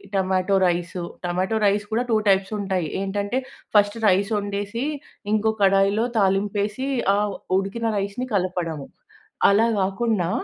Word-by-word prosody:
Tomato 190 Hz, 0 st, +1 dB
rice. 175 Hz, 0 st, -2 dB, 0.3 s
Tomato 185 Hz, +5 st, 0 dB
rice 205 Hz, +1 st, +2 dB
కూడా 230 Hz, +3 st, +1 dB
2 220 Hz, -, +4 dB
types 195 Hz, +1 st, +2 dB
ఉంటాయి. 190 Hz, -4 st, -1 dB
ఏంటంటే, 205 Hz, +5 st, -1 dB, 0.4 s
ఫస్ట్ 205 Hz, +1 st, +4 dB
రైస్ 195 Hz, +2 st, +2 dB
వండేసి 205 Hz, +3 st, -3 dB, 0.5 s
ఇంకో 215 Hz, +1 st, +2 dB
కడాయిలో 195 Hz, +3 st, +3 dB
తాలింపు 195 Hz, +1 st, +1 dB
యేసి 215 Hz, +6 st, -3 dB, 0.3 s
ఆహ్, 205 Hz, 0 st, 0 dB, 0.2 s
ఉడికిన 195 Hz, +4 st, -2 dB
రైస్‌ని 200 Hz, +6 st, -3 dB
కలపడము. 180 Hz, -6 st, -2 dB, 0.6 s
అలా 220 Hz, +3 st, +4 dB
గాకుండా 195 Hz, -1 st, 0 dB
200 Hz, 125 wpm, -23 LUFS, 190-210 Hz, 0.6 s, 2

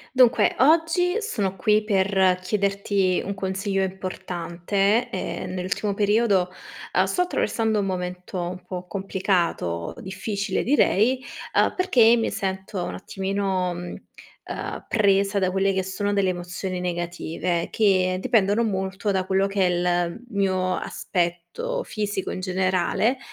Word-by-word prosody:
Dunque, 250 Hz, -2 st, +5 dB
oggi 335 Hz, -, +3 dB
sono 200 Hz, -, -1 dB
qui 210 Hz, +3 st, +2 dB
per 190 Hz, -3 st, +3 dB
chiederti 195 Hz, 0 st, 0 dB
un 200 Hz, -, -2 dB
consiglio 195 Hz, 0 st, -2 dB
importante. 190 Hz, +3 st, -1 dB
Ehm, 185 Hz, -3 st, -4 dB
nell'ultimo 190 Hz, +2 st, -2 dB
periodo, 205 Hz, -3 st, +2 dB, 0.4 s
uhm, -, -, +4 dB
sto 360 Hz, -, +1 dB
attraversando 225 Hz, -10 st, 0 dB
un 200 Hz, -, 0 dB
momento 180 Hz, 0 st, -4 dB
un 180 Hz, +1 st, -6 dB
po' 180 Hz, 0 st, -6 dB
complicato, 180 Hz, -, -1 dB
difficile 200 Hz, +2 st, -2 dB
direi, 255 Hz, -2 st, +3 dB, 0.4 s
uhm, -, -, +4 dB
perché 235 Hz, -10 st, +5 dB
mi 230 Hz, -, 0 dB
sento 190 Hz, 0 st, -3 dB
un -, -, -4 dB
attimino, 190 Hz, -1 st, -2 dB
mhmm, 175 Hz, 0 st, -6 dB, 0.5 s
ehm, -, -, -5 dB
presa 200 Hz, -2 st, +3 dB
da 185 Hz, -1 st, +2 dB
quelle 195 Hz, +1 st, +1 dB
che 190 Hz, 0 st, 0 dB
sono 200 Hz, +2 st, -2 dB
delle 195 Hz, -2 st, +2 dB
emozioni 180 Hz, +1 st, -4 dB
negative, 175 Hz, -1 st, -2 dB
che 185 Hz, -4 st, +3 dB
dipendono 210 Hz, +1 st, +3 dB
molto 195 Hz, 0 st, -2 dB
da 190 Hz, -2 st, +1 dB
quello 190 Hz, +1 st, +2 dB
che 195 Hz, -1 st, +1 dB
è -, -, +3 dB
l 175 Hz, +2 st, 0 dB
mio 185 Hz, -2 st, +1 dB
aspetto 180 Hz, -, -2 dB
fisico 205 Hz, -, -3 dB
in -, -, -4 dB
generale 185 Hz, +6 st, +1 dB
190 Hz, 130 wpm, -24 LUFS, 185-205 Hz, 0.5 s, Dunque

